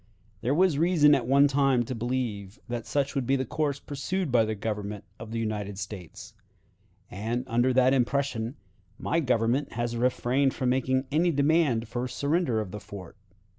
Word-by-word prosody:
There 130 +5 +1
was 175 -4 +3
reason 160 -3 +5
at 130 -4 +1
one 140 +2 +5
time 135 -3 +2
to 125 - -5
believe 115 -4 -3
that 120 -1 -4
such 140 -1 0
would 135 -4 -2
be 135 - +3
the 130 -1 -1
course 145 -1 -1
pursued 155 +4 -3
by 115 -2 +4
the 110 0 -2
Government 105 -1 -4 0.2
of 115 - -8
the 115 - -4
United 105 -3 -3
States; 100 -4 -8 0.8
and, 115 +6 -2
under 120 +1 +2
that 130 +1 +4
impression, 130 -2 0 0.4
my 165 - 0
Government 125 -1 +1
has 120 0 -2
refrained 125 +2 +1
from 130 - 0
making 130 +1 +1
any 165 +4 +3
demand 145 -6 +2
for 120 +2 -4
the 125 - -2
surrender 140 0 0
of 105 -4 -4
the 105 - -6
fort. 95 -4 -10
125 Hz, 175 wpm, -27 LUFS, 115-140 Hz, 0.8 s, reason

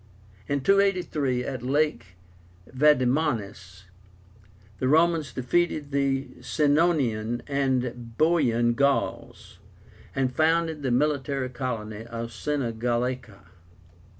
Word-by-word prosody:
In 140 -1 -1
283, 175 -8 +1
at 130 -2 -5
Lake 135 - -1 0.5
Vadimónis, 125 - +1 1.0
the 130 - 0
Romans 160 -1 +3
defeated 145 +3 -1
the 140 -1 0
Senonian 140 -7 +1
and 125 -4 -2
Boian 125 -8 +3
Gauls, 140 +1 -1 0.6
and 130 -2 0
founded 160 -1 +1
the 135 - -1
military 135 0 0
colony 110 -4 -5
of 115 0 -6
SENA 140 0 -2
GALLICA. 120 -2 -2
130 Hz, 90 wpm, -26 LUFS, 120-150 Hz, 1.0 s, Romans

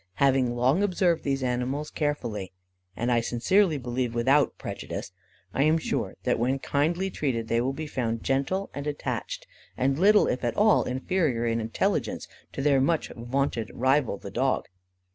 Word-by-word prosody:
Having 130 -3 +2
long 130 +9 +2
observed 180 -4 +1
these 135 -1 -1
animals 130 +4 -2
carefully, 120 - -3 0.4
and, 120 +1 -1
I 120 -1 +3
sincerely 155 - +2
believe, 125 -2 -2
without 135 +5 +3
prejudice, - - -6 0.4
I - - 0
am 155 +3 +4
sure 160 - -2
that - - +1
when 130 +3 +1
kindly 165 +8 0
treated 120 -9 -2
they 115 0 +2
will 130 +2 0
be 155 +3 -5
found 115 -6 -2
gentle 140 +9 0
and 140 +1 -5
attached, 145 -1 -4 0.3
and 135 +3 +1
little, 210 +3 +6
if 125 - -2
at 120 - -1
all, 215 +1 +4
inferior 130 -2 0
in 115 0 0
intelligence 110 0 -1 0.3
to 135 - -3
their 140 -2 +4
much 160 +4 +1
vaunted 120 0 -1
rival, 130 -3 +2
the 100 - -9
dog. 130 +5 0
135 Hz, 160 wpm, -27 LUFS, 120-150 Hz, 0.4 s, little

